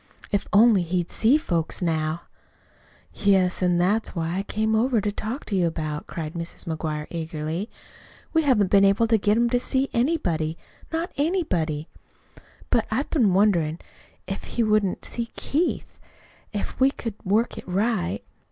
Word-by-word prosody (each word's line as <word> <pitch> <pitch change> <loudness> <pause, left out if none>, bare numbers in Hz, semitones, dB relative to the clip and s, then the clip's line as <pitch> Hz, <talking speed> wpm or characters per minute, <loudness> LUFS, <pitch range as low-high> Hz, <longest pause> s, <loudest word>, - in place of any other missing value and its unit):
"If 205 - 0
only 215 -1 +6
he'd 175 0 -2
see 240 +7 +4
folks 170 - -2
now." 160 -1 -1 0.9
"Yes, 190 -3 +2
an' 180 -1 +3
that's 200 +6 +1
what 165 -1 -1
I 185 +3 -1
came 220 +2 -1
over 235 +2 +3
to 205 0 -1
talk 220 +6 -4
to 205 - -2
you 180 -2 +3
about," 155 -2 -4
cried 160 -2 -5
Mrs. 170 0 -6
McGuire 155 -2 -3
eagerly. 160 +4 -4 0.6
"We 320 - +4
haven't 240 - +2
been 200 -1 +6
able 200 +3 +4
to 225 -1 +3
get 210 +2 +2
him 235 0 +3
to 245 - +3
see 265 +2 0
anybody 175 - 0 0.3
not 330 +2 -2
anybody. 180 - 0 0.8
But 225 - +2
I've 255 +7 -1
been 220 - +3
wonderin' 175 -6 +3 0.5
if 195 +1 -5
he 235 - -1
wouldn't 215 -3 +1
see 235 -1 -3
Keith, 320 +5 -1 0.5
if 205 - -4
we 265 +1 +6
could 230 -5 -5
work 215 +5 +1
it - - -12
right. 185 - 0
200 Hz, 160 wpm, -24 LUFS, 170-230 Hz, 0.9 s, only